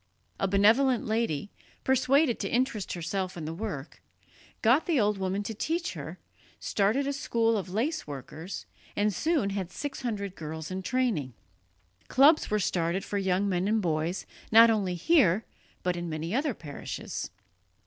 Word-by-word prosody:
A 195 Hz, -, +1 dB
benevolent 225 Hz, +6 st, +4 dB
lady, 215 Hz, -6 st, -1 dB, 0.3 s
persuaded 265 Hz, 0 st, +3 dB
to -, -, -2 dB
interest 235 Hz, -5 st, 0 dB
herself 180 Hz, +2 st, -3 dB
in 160 Hz, -, -5 dB
the 160 Hz, -, -4 dB
work, 175 Hz, -7 st, -6 dB, 0.6 s
got 250 Hz, +8 st, +4 dB
the 325 Hz, -6 st, +3 dB
old 210 Hz, -2 st, +2 dB
woman 190 Hz, +2 st, -1 dB
to 225 Hz, -, -4 dB
teach 335 Hz, -, -2 dB
her, -, -, -7 dB, 0.4 s
started 215 Hz, +8 st, +1 dB
a 280 Hz, -, -1 dB
school 230 Hz, -4 st, +1 dB
of 195 Hz, -3 st, -3 dB
lace 255 Hz, -, -1 dB
workers, 150 Hz, +6 st, -7 dB, 0.3 s
and 205 Hz, 0 st, +1 dB
soon 300 Hz, -, +1 dB
had 190 Hz, -3 st, -3 dB
six 285 Hz, +8 st, -5 dB
hundred 205 Hz, -6 st, -3 dB
girls 160 Hz, -1 st, -6 dB
in 190 Hz, +1 st, -3 dB
training. 190 Hz, -, -1 dB, 0.7 s
Clubs 295 Hz, +4 st, +5 dB
were 210 Hz, -, +2 dB
started 180 Hz, -1 st, 0 dB
for 205 Hz, -, -2 dB
young 190 Hz, +1 st, +1 dB
men 185 Hz, 0 st, 0 dB
and 220 Hz, +1 st, +2 dB
boys, 165 Hz, -1 st, -1 dB, 0.3 s
not 230 Hz, +1 st, +8 dB
only 195 Hz, -5 st, 0 dB
here, 220 Hz, -, +3 dB, 0.4 s
but 180 Hz, -1 st, +1 dB
in 175 Hz, -1 st, -4 dB
many 160 Hz, +3 st, -3 dB
other 275 Hz, -1 st, 0 dB
parishes. 145 Hz, -4 st, -6 dB
205 Hz, 160 wpm, -28 LUFS, 180-240 Hz, 0.7 s, not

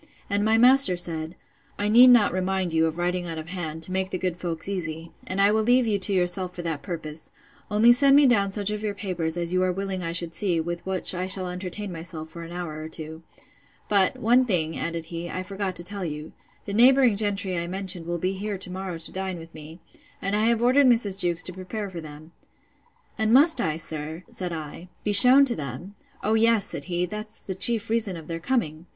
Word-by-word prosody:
And 205 Hz, +1 st, +1 dB
my 220 Hz, +1 st, +3 dB
master 250 Hz, -5 st, +6 dB
said, 165 Hz, -1 st, -3 dB, 0.4 s
I 205 Hz, -, -1 dB
need 240 Hz, +4 st, +7 dB
not 240 Hz, -7 st, +5 dB
remind 185 Hz, -1 st, -2 dB
you 160 Hz, 0 st, +2 dB
of 160 Hz, +1 st, -5 dB
writing 175 Hz, 0 st, -2 dB
out 165 Hz, -1 st, -6 dB
of 160 Hz, +1 st, -7 dB
hand, 160 Hz, -3 st, -5 dB
to 185 Hz, -, -2 dB
make 190 Hz, 0 st, -1 dB
the 185 Hz, -, -3 dB
good 180 Hz, -1 st, -2 dB
folks 170 Hz, -2 st, -2 dB
easy: 165 Hz, -4 st, -5 dB, 0.2 s
and 185 Hz, -, -4 dB
I 200 Hz, +1 st, +5 dB
will 220 Hz, +1 st, +2 dB
leave 245 Hz, +3 st, +3 dB
you 210 Hz, -3 st, 0 dB
to 195 Hz, -, +1 dB
yourself 180 Hz, 0 st, -1 dB
for 175 Hz, -, -6 dB
that 160 Hz, -3 st, -4 dB
purpose; 155 Hz, -4 st, -7 dB, 0.4 s
only 220 Hz, +3 st, +5 dB
send 275 Hz, +2 st, +4 dB
me 290 Hz, 0 st, +6 dB
down 200 Hz, -6 st, +2 dB
such 205 Hz, 0 st, -2 dB
of 210 Hz, 0 st, -4 dB
your 210 Hz, -2 st, -3 dB
papers, 175 Hz, -5 st, -3 dB
as 170 Hz, 0 st, -1 dB
you 185 Hz, -, +2 dB
are 185 Hz, 0 st, +1 dB
willing 190 Hz, 0 st, -4 dB
I 165 Hz, -1 st, -3 dB
should 170 Hz, -1 st, -2 dB
see, 175 Hz, -1 st, 0 dB
with 170 Hz, +1 st, -4 dB
which 190 Hz, -1 st, -1 dB
I 185 Hz, 0 st, -3 dB
shall 185 Hz, -1 st, +2 dB
entertain 185 Hz, +2 st, -6 dB
myself 165 Hz, -1 st, -8 dB
for 170 Hz, +2 st, -10 dB
an 165 Hz, 0 st, -9 dB
hour 175 Hz, -3 st, -6 dB
or 155 Hz, -, -7 dB
two. 160 Hz, 0 st, -7 dB, 0.7 s
But, 195 Hz, -3 st, +2 dB
one 245 Hz, +3 st, +3 dB
thing, 165 Hz, -9 st, -1 dB
added 165 Hz, -1 st, -4 dB
he, 170 Hz, +1 st, -5 dB
I 185 Hz, -, -4 dB
forgot 195 Hz, -1 st, -4 dB
to 175 Hz, -, +1 dB
tell 200 Hz, +2 st, -2 dB
you: 150 Hz, -2 st, -6 dB, 0.3 s
The 200 Hz, -, -5 dB
neighbouring 250 Hz, 0 st, +5 dB
gentry 200 Hz, -2 st, 0 dB
I 170 Hz, 0 st, -3 dB
mentioned 185 Hz, -2 st, -4 dB
will 175 Hz, 0 st, -2 dB
be 185 Hz, +3 st, -2 dB
here 200 Hz, +1 st, -4 dB
to 185 Hz, -1 st, +1 dB
morrow 185 Hz, -2 st, -5 dB
to 165 Hz, -, -5 dB
dine 190 Hz, -1 st, -4 dB
with 165 Hz, 0 st, -12 dB
me, 160 Hz, +2 st, -12 dB, 0.4 s
and 195 Hz, +1 st, -2 dB
I 215 Hz, +1 st, +1 dB
have 235 Hz, 0 st, +1 dB
ordered 260 Hz, +3 st, +4 dB
Mrs. 215 Hz, -6 st, +2 dB
Jewkes 175 Hz, -1 st, 0 dB
to 185 Hz, -, -2 dB
prepare 190 Hz, +2 st, -6 dB
for 170 Hz, -2 st, -7 dB
them. 155 Hz, +1 st, -12 dB, 0.9 s
And 220 Hz, 0 st, +1 dB
must 275 Hz, +1 st, +5 dB
I, 155 Hz, -1 st, -1 dB
sir, 160 Hz, +1 st, -5 dB
said 180 Hz, -2 st, -5 dB
I, 160 Hz, +2 st, -8 dB
be 210 Hz, -, -1 dB
shewn 255 Hz, +7 st, +9 dB
to 245 Hz, -3 st, +1 dB
them? 145 Hz, +7 st, -7 dB, 0.3 s
O 215 Hz, -, +1 dB
yes, 225 Hz, -2 st, +3 dB
said -, -, -4 dB
he; 175 Hz, 0 st, -1 dB
that's 215 Hz, +3 st, -6 dB
the 190 Hz, -, -6 dB
chief 225 Hz, +3 st, +3 dB
reason 215 Hz, -6 st, +1 dB
of 160 Hz, -, -10 dB
their 165 Hz, 0 st, -5 dB
coming. 165 Hz, -, -2 dB
185 Hz, 230 wpm, -24 LUFS, 165-210 Hz, 0.9 s, shewn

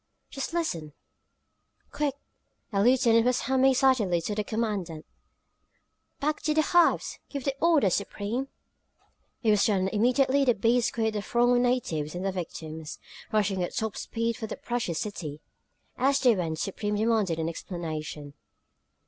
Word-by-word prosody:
"Just 275 Hz, +3 st, -4 dB
listen!" 175 Hz, -, -2 dB, 1.0 s
"Quick!" 290 Hz, -2 st, -1 dB, 0.6 s
a 195 Hz, -, +2 dB
lieutenant 235 Hz, -1 st, +4 dB
was 250 Hz, +1 st, +1 dB
humming 265 Hz, +1 st, +3 dB
excitedly 250 Hz, -9 st, +3 dB
to 210 Hz, -, -3 dB
the 210 Hz, 0 st, -1 dB
commandant. 205 Hz, -8 st, -3 dB, 1.1 s
"Back 300 Hz, +1 st, -1 dB
to 305 Hz, -1 st, 0 dB
the 310 Hz, -, +4 dB
hives; 350 Hz, +2 st, +2 dB
give 280 Hz, -2 st, -5 dB
the 275 Hz, -, 0 dB
order, 310 Hz, -, +4 dB
Supreme!" 205 Hz, +7 st, -2 dB, 1.0 s
It 220 Hz, -, +4 dB
was 210 Hz, -1 st, +4 dB
done, 200 Hz, -4 st, +2 dB
and 190 Hz, -, 0 dB
immediately 260 Hz, +6 st, +3 dB
the 245 Hz, -3 st, +3 dB
bees 230 Hz, +3 st, +2 dB
quit 220 Hz, -1 st, -1 dB
the 210 Hz, -, -2 dB
throng 240 Hz, +3 st, +2 dB
of 245 Hz, -, +3 dB
natives 175 Hz, -12 st, -1 dB
and 180 Hz, +2 st, -4 dB
their 195 Hz, -, +1 dB
victims, 160 Hz, -3 st, -6 dB, 0.3 s
rushing 205 Hz, -3 st, +1 dB
at 175 Hz, -, -3 dB
top 220 Hz, -1 st, -2 dB
speed 230 Hz, 0 st, -2 dB
for 220 Hz, -, -5 dB
their -, -, -6 dB
precious 235 Hz, -9 st, -2 dB
city. 155 Hz, -8 st, -5 dB, 0.6 s
As 275 Hz, +1 st, +3 dB
they 245 Hz, -4 st, +4 dB
went, 165 Hz, -4 st, -2 dB
Supreme 205 Hz, +4 st, -2 dB
demanded 215 Hz, -5 st, +1 dB
an 160 Hz, 0 st, -1 dB
explanation. 155 Hz, -4 st, -6 dB
220 Hz, 155 wpm, -27 LUFS, 180-250 Hz, 1.1 s, lieutenant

